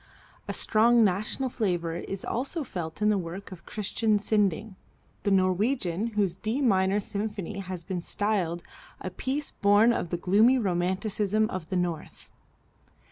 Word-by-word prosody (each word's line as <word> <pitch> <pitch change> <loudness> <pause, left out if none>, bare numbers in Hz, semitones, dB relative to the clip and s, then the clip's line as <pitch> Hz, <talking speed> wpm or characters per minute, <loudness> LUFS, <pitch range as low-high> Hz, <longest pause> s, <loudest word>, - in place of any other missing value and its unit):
A - - -2
strong 230 +2 +4
national 215 +7 0
flavor 175 -8 -1
is 195 +2 -5
also 280 +7 -2
felt 175 -4 -5
in 210 - +4
the 205 -2 +2
work 180 +4 -7
of 185 - -11
Christian 215 +1 0
Sinding, 205 -1 0 0.5
the 205 - 0
Norwegian, 195 +1 +1
whose 195 -4 +2
D 220 +7 -2
minor 195 -6 +3
symphony 200 -1 -4
has 185 -3 -6
been 180 +1 -3
styled 180 -3 -1 0.4
"a 185 - -5
piece 270 +10 -2
born 205 +4 +4
of 175 - -2
the 175 - -1
gloomy 210 +9 +4
romanticism 200 +2 0
of 180 -3 -5
the 185 - 0
North." 175 -3 -4
200 Hz, 145 wpm, -27 LUFS, 180-220 Hz, 0.5 s, strong